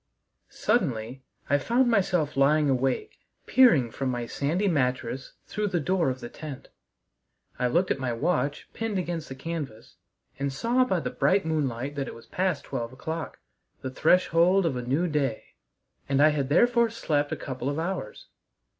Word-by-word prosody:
II - - -24
Suddenly 130 - 0 0.2
I 145 +1 +3
found 240 - +2
myself 180 -9 +1
lying 145 +1 +4
awake, 130 0 -1 0.3
peering 215 - +5
from 135 +2 -2
my 120 -1 -2
sandy 160 - -1
mattress 130 -5 -1
through 210 0 -2
the 180 -3 0
door 170 0 +1
of 130 0 -4
the - - -5
tent. 145 +1 -9 0.9
I 125 - +2
looked 175 +9 +1
at - - 0
my 130 -2 -1
watch 145 +4 -1
pinned 225 -3 -2
against 170 -3 -3
the 130 - -6
canvas, 135 - -6 0.4
and 140 0 -1
saw 235 - +2
by 185 -8 0
the - - -3
bright 195 -1 +2
moonlight 140 -4 -1
that 135 -2 -2
it - - -7
was 115 0 -13
past 180 +4 -1
twelve 115 0 -4
o'clock 160 +4 -5 0.4
the 130 - -4
threshold 180 +5 +4
of 155 -6 0
a 125 - -2
new 140 +9 0
day 140 -8 -2 0.6
and 135 0 +2
I 150 +2 +7
had 140 -3 -1
therefore 235 +8 +4
slept 150 -10 -1
a - - 0
couple 130 0 -4
of 145 - -2
hours. 170 - -4
150 Hz, 170 wpm, -27 LUFS, 130-180 Hz, 0.9 s, I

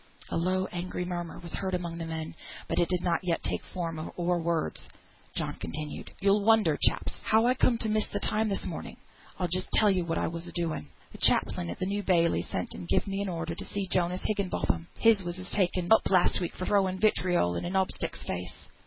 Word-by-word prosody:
A - - -3
low 185 +2 +1
angry 180 0 -3
murmur 175 -1 -4
was 170 -1 -8
heard 190 -1 -1
among 170 -1 -4
the 165 - -4
men, 160 -1 -4 0.3
but - - 0
it 175 - +2
did 180 -1 0
not 170 -2 +2
yet 175 -2 -1
take - - -1
form 165 -3 -4
or 175 0 +1
words. 165 - -2 0.5
John - - -1
continued 150 0 -5
"You'll 200 +1 +3
wonder, 215 -8 +5
chaps, - - +2
how 220 +1 +4
I 250 - +5
came 255 -2 +3
to 225 - -2
miss 215 0 +1
the 205 - -3
time 215 +2 +1
this 195 - -2
morning; - - -6 0.4
I'll 180 - 0
just 185 +2 0
tell 210 -2 +5
you 185 -2 +1
what 165 -1 -2
I - - +1
was 170 +1 -5
a - - -5
doing. 165 - -2 0.3
Th' - - -12
chaplain 85 - +3
at 85 - -5
the - - -2
New 200 +2 -1
Bailey 170 - +3
sent - - -4
and 90 - -7
gived - - +2
me 195 0 -2
an 200 - -2
order 165 -1 -3
to - - -6
see 200 -1 -3
Jonas 180 0 +1
Higginbotham; 195 -5 -1
him 225 - +6
as 210 -3 +1
was 180 +1 -5
taken 180 -2 +1
up 220 - +4
last 185 -2 +4
week 175 - -3
for 185 - -4
throwing 190 -2 +2
vitriol 180 - +2
in - - -3
a - - -2
knob 190 0 +1
stick's - - -4
face. 90 0 -6
180 Hz, 230 wpm, -29 LUFS, 170-195 Hz, 0.5 s, him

